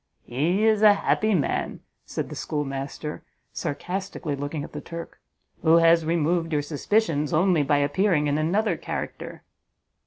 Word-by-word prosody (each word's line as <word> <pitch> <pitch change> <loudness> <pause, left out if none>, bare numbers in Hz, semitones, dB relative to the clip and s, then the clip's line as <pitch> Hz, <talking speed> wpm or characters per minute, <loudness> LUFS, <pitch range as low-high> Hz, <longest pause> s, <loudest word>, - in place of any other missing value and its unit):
"He 165 - 0
is 215 -1 +3
a 210 -1 +7
happy 215 +1 +1
man," 150 - -1 0.3
said - - -4
the - - -7
schoolmaster, 145 0 -4 0.3
sarcastically 180 -1 -4
looking 145 +2 -4
at - - -9
the 150 - -5
Turk, 170 +1 -8 0.4
"who 160 0 +5
has 165 -1 +5
removed 165 +1 +1
your 150 -2 +1
suspicions 150 0 0
only 175 0 +3
by 145 0 +2
appearing 150 +3 +2
in 145 +1 +1
another 180 +3 +1
character!" - - -6
160 Hz, 145 wpm, -25 LUFS, 145-185 Hz, 0.4 s, a